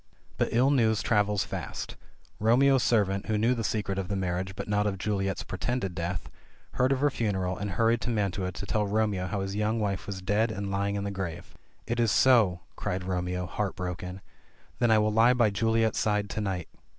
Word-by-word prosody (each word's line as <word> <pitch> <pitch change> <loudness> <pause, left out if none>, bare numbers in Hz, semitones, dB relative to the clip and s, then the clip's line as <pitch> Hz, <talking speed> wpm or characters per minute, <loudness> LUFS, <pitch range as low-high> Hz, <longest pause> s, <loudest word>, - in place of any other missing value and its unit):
But - - +2
ill 130 +4 +3
news 110 -5 +2
travels 105 -3 +2
fast. - - -5 0.4
Romeo's 130 +4 +4
servant, 100 -5 +1
who 110 - +1
knew 115 +4 +3
the 115 -2 -3
secret 100 -3 -1
of 95 - -3
the 100 - -2
marriage 95 0 -2
but - - -5
not 105 0 +1
of 100 -2 -2
Juliet's 95 0 -1
pretended 95 +1 -2
death, 85 -1 -3 0.4
heard 130 +2 +1
of 135 -1 +1
her 145 0 +3
fu 120 - -2
neral, 95 -3 -1
and 105 +2 -4
hurried 115 +5 +2
to - - -3
Mantua 100 -4 -1
to 100 - -6
tell 105 +1 0
Romeo 105 -3 0
how 100 +1 -2
his 95 +1 -3
young 105 +2 0
wife 100 -3 -2
was 100 -2 -4
dead 105 +4 +1
and 100 -1 -4
lying 100 +1 0
in 100 - -2
the 100 - -3
grave. 90 -3 -5 0.3
"Is 120 +1 -2
it 115 - +3
so!'' 110 -5 +4
cried 90 +1 -3
Romeo, 90 0 -2
heart 100 +2 -3
broken. 90 0 -5 0.6
"Then 120 -1 +3
I 110 - +6
will 105 0 +2
lie 115 +3 +5
by 120 -4 +3
Juliet's 115 +1 +1
side 105 -1 0
to 110 - -2
night." 95 -5 -2
105 Hz, 210 wpm, -28 LUFS, 95-110 Hz, 0.6 s, I